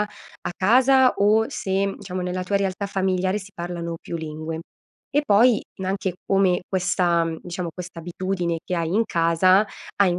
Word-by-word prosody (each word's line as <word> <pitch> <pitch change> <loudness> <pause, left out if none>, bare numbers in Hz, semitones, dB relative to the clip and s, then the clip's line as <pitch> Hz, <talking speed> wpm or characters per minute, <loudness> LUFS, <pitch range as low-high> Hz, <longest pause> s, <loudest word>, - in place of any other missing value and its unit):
a 210 -3 -6
casa 255 +5 +5
o 215 +2 +4
se, 195 +1 -1
diciamo, 185 -2 -5
nella 180 0 -2
tua 200 +2 0
realtà 195 0 -1
familiare 190 0 0
si 200 -1 -7
parlano 170 -1 -4
più 170 - -5
lingue; 160 0 -5 0.5
e 290 - +3
poi 215 +2 +5 0.2
n - - -3
anche 190 -1 -2
come 195 -2 +2
questa, 180 -2 +1
mhmm 165 -1 -4
diciamo 175 0 -4
questa 180 -2 -8
abitudine 175 0 -2
che 180 - -2
hai 165 -2 -1
in 225 - +4
casa 185 +3 +3 0.3
ha 200 - +5
in 175 -1 +1
185 Hz, 170 wpm, -23 LUFS, 175-200 Hz, 0.5 s, casa